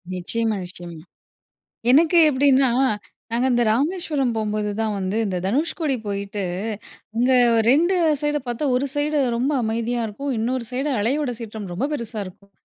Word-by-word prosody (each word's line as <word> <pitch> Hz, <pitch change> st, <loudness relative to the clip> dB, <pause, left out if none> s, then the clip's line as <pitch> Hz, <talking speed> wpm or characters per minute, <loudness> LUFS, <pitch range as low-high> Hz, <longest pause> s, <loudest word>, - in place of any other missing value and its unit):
நிச்சயமா, 220 Hz, +4 st, -1 dB
நிச்சயமா. 175 Hz, -2 st, -9 dB, 0.9 s
எனக்கு 325 Hz, +5 st, +5 dB
எப்டீன்னா, 265 Hz, -1 st, +4 dB, 0.6 s
நாங்க 245 Hz, +3 st, +2 dB
இந்த 240 Hz, 0 st, +3 dB
ராமேஸ்வரம் 285 Hz, 0 st, 0 dB
போகும்போது 215 Hz, -1 st, -1 dB
தான் 220 Hz, -1 st, 0 dB
வந்து, 190 Hz, +3 st, -2 dB
இந்த 185 Hz, -2 st, -2 dB
தனுஷ்கோடி 290 Hz, -, 0 dB
போயிட்டு, 200 Hz, 0 st, -3 dB, 0.8 s
இங்க 255 Hz, +2 st, +3 dB, 0.2 s
ஒரு 225 Hz, -, +3 dB
2 345 Hz, +6 st, +3 dB, 0.3 s
சைடு 295 Hz, 0 st, 0 dB
பார்த்தா, 240 Hz, +5 st, -2 dB
ஒரு 270 Hz, +3 st, +1 dB
சைடு 295 Hz, +1 st, 0 dB, 0.2 s
ரொம்ப 260 Hz, +5 st, 0 dB
அமைதியா 230 Hz, +2 st, -1 dB
இருக்கும், 275 Hz, +7 st, -5 dB
இன்னொரு 245 Hz, +2 st, -1 dB
சைடு 270 Hz, +4 st, -1 dB
அலையோட 260 Hz, +5 st, 0 dB
சீற்றம் 220 Hz, -2 st, -7 dB
ரொம்ப 230 Hz, +10 st, -1 dB
பெருசா 230 Hz, -5 st, -4 dB
இருக்கும். 200 Hz, +2 st, -14 dB
240 Hz, 140 wpm, -22 LUFS, 215-285 Hz, 0.9 s, எனக்கு